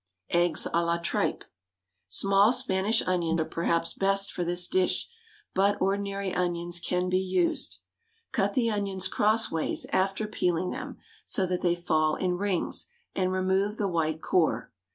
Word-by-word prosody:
EGGS 175 -2 +3
A 170 - +3
LA 170 0 +1
TRIPE. 170 0 -1 0.6
Small 195 - +4
Spanish 225 -3 +1
onions 170 -2 0
are 160 - +1
perhaps 165 0 -1
best 195 0 +1
for 175 - -3
this 175 +1 0
dish, 185 -1 +1 0.5
but 200 +2 +2
ordinary 200 0 -1
onions 175 -1 -1
can 180 +1 -1
be 185 0 +2
used. 185 -2 0 0.5
Cut 200 -1 0
the 230 -3 +2
onions 195 -3 -1
cross 220 +2 +2
ways 160 -1 0
after 195 +3 +1
peeling 180 -4 -1
them, - - -6 0.3
so 190 - 0
that 180 0 -2
they 175 -1 +2
fall 155 -3 +1
in 180 -1 -1
rings, 200 -3 -1 0.3
and 185 -1 0
remove 190 +3 0
the 205 - 0
white 160 -3 -1
core. 155 -10 +1
185 Hz, 155 wpm, -28 LUFS, 170-195 Hz, 0.6 s, Small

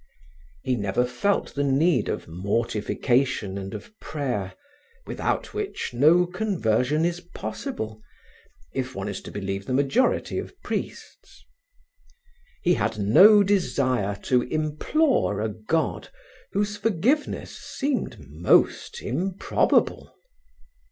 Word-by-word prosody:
He 130 - +1
never 105 +2 0
felt 200 +11 0
the 145 - -1
need 140 -1 +2
of - - -3
mortification 110 +4 0
and 95 0 -5
of 235 - -9
prayer, 125 -11 -3 0.5
without - - -2
which 420 -1 -3
no 155 +8 +5
conversion 160 - 0
in 175 - +1 0.2
possible, 110 0 -5 0.7
if 130 -1 -3
one 95 +1 -4
is 100 -2 -4
to - - -9
believe 95 -1 -4
the 130 - 0
majority 140 - +1
of - - -9
priests. - - -6 1.2
He 175 - +4
had 110 - -1
no 195 - +7
desire 130 - +1
to 125 -1 +3
implore 155 - +1
a 110 +1 -1
God 110 +10 -2 0.4
whose 205 +1 0
forgiveness 225 - 0
seemed 275 -2 -3
most 75 +5 +2
improbable. 180 +9 0
130 Hz, 110 wpm, -25 LUFS, 105-180 Hz, 1.2 s, no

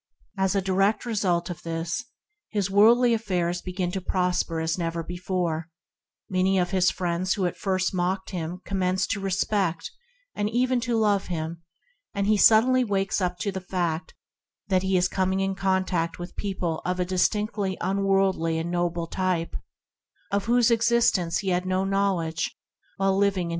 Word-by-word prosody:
As 190 0 +1
a 195 - +1
direct 195 +4 +1
result 185 -7 0
of 175 - -8
this, 165 +1 -3 0.4
his 200 -3 -1
worldly 235 +4 +5
affairs 180 -6 -1
begin 180 -1 -3
to 190 0 -3
prosper 180 -2 0
as 160 0 0
never 165 -1 -2
before; 175 -2 -3 0.6
many 190 +1 +1
of 180 0 +1
the 190 -1 +1
friends 180 0 +1
who 195 - 0
at 175 - -1
first 185 -1 -1
mocked 185 +1 -1
him 175 0 -4
commence 185 -1 0
to 210 - -2
respect, 195 -2 -1 0.4
and 205 0 -1
even 250 +2 +1
to 235 0 0
love 205 -3 +2
him; 165 -1 -4 0.5
and 200 0 0
he 215 +1 +4
suddenly 230 +5 +5
awakens 195 -4 0 0.2
to 205 -2 -1
the 190 0 -5
fact 175 -3 -3 0.5
that 185 -1 +3
he 190 0 +1
is 180 0 +3
coming 190 0 0
in 195 0 0
contact 190 -3 0
with 175 0 -8
people 185 -5 -3
of 180 +1 -2
a 180 - +1
distinctly 195 +1 0
unworldly 195 -4 +1
and 165 +1 -3
noble 175 -1 -1
type, 180 -1 -2 0.8
of 200 0 0
whose 240 0 +3
existence 230 -7 +2
he 195 - -2
had 180 0 0
no 185 +1 +1
knowledge. 190 -5 -1
185 Hz, 155 wpm, -25 LUFS, 175-200 Hz, 0.8 s, worldly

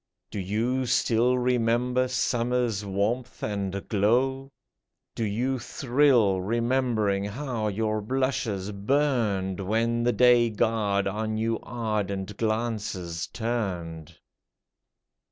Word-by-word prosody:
Do - - -4
you 115 +7 -1
still 120 +1 +2
remember 125 +1 +1
summer's 120 -3 0
warmth 105 +6 -2
and 100 -2 -3
glow? 130 +6 +1 0.6
Do 115 - -3
you 125 +5 -1
thrill, 120 -6 +2
remembering 115 -2 0
how 115 0 -3
your 110 +1 -1
blushes 110 -5 -1
burned 105 -4 0
When 115 +4 0
the 120 +1 +2
Day 120 -1 +5
god 105 -2 +1
on 110 +2 -2
you 115 0 0
ardent 105 -4 -3
glances 110 -7 -2
turned 90 -9 -4
115 Hz, 100 wpm, -26 LUFS, 100-125 Hz, 0.6 s, Day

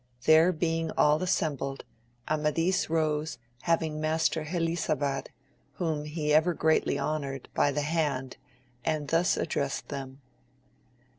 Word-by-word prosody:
There 160 +3 +6
being 165 -1 -1
all 150 +1 +4
assembled, 140 -6 -1 0.4
Amadis 155 +4 +1
rose 155 -2 0 0.2
having 160 -2 0
Master 160 0 +1
Helisabad, 155 -4 -1 0.5
whom 155 -4 -2
he 150 -1 -1
ever 160 +3 +4
greatly 160 -2 +2
honoured, 140 -2 -3
by 145 - +3
the 145 +1 -1
hand, 145 -5 -1 0.5
and 155 -3 -1
thus 165 +1 +2
addressed 140 -1 -2
them. 135 -1 -6
155 Hz, 115 wpm, -28 LUFS, 145-165 Hz, 0.5 s, There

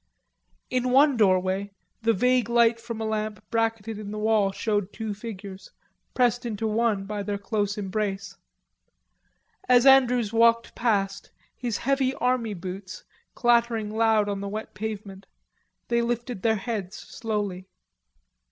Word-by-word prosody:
In 255 0 0
one 275 +2 +5
doorway 190 -2 +2 0.3
the 230 0 +3
vague 250 +2 +2
light 235 -1 +4
from 230 -1 -6
a 220 - -2
lamp 215 -1 -2
bracketed 225 -2 -1
in 210 -1 -7
the 215 - -5
wall 210 -2 +2
showed 205 -1 -1
two 220 -2 -4
figures, 200 -3 -9 0.5
pressed 245 -1 +2
into 225 -2 -3
one 215 -2 +1
by 210 0 -4
their 205 0 -3
close 205 0 -2
embrace. 200 0 -3 1.3
As 250 0 +6
Andrews 250 -5 +5
walked 230 0 +3
past, 200 -4 -1 0.3
his 240 -4 -3
heavy 270 0 0
army 245 -4 0
boots 185 +1 -7 0.3
clattering 235 -3 +2
loud 220 -2 +3
on 200 -1 -3
the 200 - -4
wet 215 +2 -6
pavement, 200 -1 -6 0.6
they 235 0 +2
lifted 235 -2 -3
their 220 +1 +2
heads 210 -3 -4
slowly. 205 -4 -4
220 Hz, 135 wpm, -26 LUFS, 200-235 Hz, 1.3 s, As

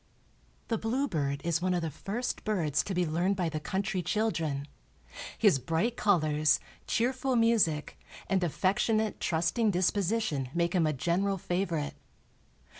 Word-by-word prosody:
The 225 -2 0
bluebird 180 - -1
is 170 0 0
one 185 0 +1
of 175 - -1
the 160 - -2
first 210 - -4
birds 170 -10 +1
to 195 - -3
be 180 0 +2
learned 175 +5 +1
by 180 -3 0
the 155 -1 -3
country 190 +6 -2
children; 165 -8 -1 0.7
his 135 - +4
bright 165 - 0
colors, 155 -8 +3 0.3
cheerful 255 +2 0
music 225 -10 +2 0.3
and 190 -2 +1
affectionate, 205 +5 +1
trusting 175 +7 +1
disposition 185 - 0
make 170 0 +1
him 170 -4 +3
a - - +2
general 180 +8 0
favorite. 175 -4 -2
180 Hz, 135 wpm, -30 LUFS, 160-215 Hz, 0.7 s, his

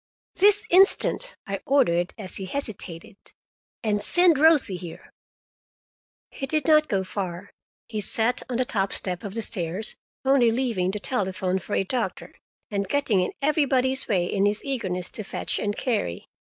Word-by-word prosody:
"This 415 +2 +4
instant!" 390 +6 +4
I 195 -1 -4
ordered, 180 -11 +2
as 195 -4 -7
he 195 - -5
hesitated. 195 -6 -5 0.7
"And 210 -2 0
send 350 - +4
Rosie 295 - +5
here." 175 -2 -10 1.2
He 270 - -5
did 305 0 -1
not 305 -1 +5
go 195 -4 0
far. 185 -1 -5 0.4
He 215 -2 -3
sat 225 +4 +1
on 245 - -1
the 255 - +1
top 195 -5 -1
step 180 0 -3
of 200 -1 -6
the 230 - -2
stairs, 185 0 -4 0.3
only 265 -3 +4
leaving 225 -7 0
to 210 - -3
telephone 190 -5 -1
for - - -4
a - - +2
doctor, 240 +5 -3 0.4
and 200 -2 -2
getting 280 -9 +1
in 180 - -1
everybody's 265 -3 +1
way 185 -5 +1
in 195 +2 +1
his 205 +1 0
eagerness 190 -10 -3
to 215 - -6
fetch - - -3
and 205 0 -2
carry. 215 - -2
215 Hz, 160 wpm, -25 LUFS, 190-270 Hz, 1.2 s, Rosie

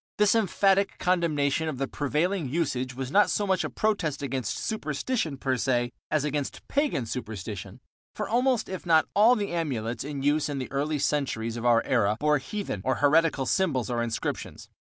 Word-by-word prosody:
This 210 -1 +4
emphatic 200 -2 +2
condemnation 160 -4 +1
of 145 - -4
the 135 +1 -1
prevailing 150 +3 -1
usage 130 -5 -1
was 130 0 -4
not 205 +4 +5
so 205 - 0
much 190 -1 +1
a - - -3
protest 165 -10 -1
against 130 -3 -2
superstition 160 - -2
per 130 -1 0
se 120 -1 0 0.2
as 155 -2 +1
against 145 -1 -3
pagan 285 - 0
superstition, 105 -2 -6 0.4
for 210 - -3
almost 250 +1 +1
if 185 -1 -6
not 160 -2 +4
all 225 +5 +6
the 205 -3 -2
amulets 125 -9 -2
in 140 -1 -5
use 150 +1 +2
in 145 - -3
the 130 - -5
early 150 +2 -1
centuries 135 -6 -1
of 120 +1 -2
our 115 -1 +4
era 105 -4 +1
bore 150 0 +3
heathen 135 - -4
or 130 +3 +1
heretical 150 -1 +3
symbols 130 - 0
or 120 -1 0
inscriptions. 115 -1 -4
145 Hz, 175 wpm, -27 LUFS, 130-185 Hz, 0.4 s, all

